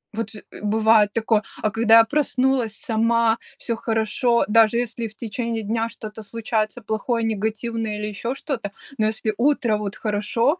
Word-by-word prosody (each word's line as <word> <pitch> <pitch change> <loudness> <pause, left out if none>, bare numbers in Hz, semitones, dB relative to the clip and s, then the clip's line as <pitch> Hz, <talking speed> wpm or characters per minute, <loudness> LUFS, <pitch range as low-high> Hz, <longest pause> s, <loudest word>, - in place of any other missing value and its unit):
Вот 225 -1 -2
же, 215 - -10
э, - - -11
бывает 215 0 +4
такое. 220 -1 +2 0.2
А 215 - +2
когда 225 0 +5
я 230 - +9
проснулась 260 -4 +1
сама, 230 0 +2 0.2
всё 230 - -2
хорошо, 225 +1 +1
даже 225 +1 +5
если 235 -1 -2
в 215 - -15
течение 230 0 -3
дня 225 +2 -1
что-то 215 -1 -8
случается 220 +2 -2
плохое, 225 +3 -1
негативное 220 0 -2
или 210 0 -3
ещё 230 +5 -3
что-то, 265 -8 -4 0.3
но 215 - +3
если 220 0 -1
утро 240 -4 +2
вот 210 -1 -4
хорошо, 230 - 0
225 Hz, 165 wpm, -23 LUFS, 215-235 Hz, 0.3 s, я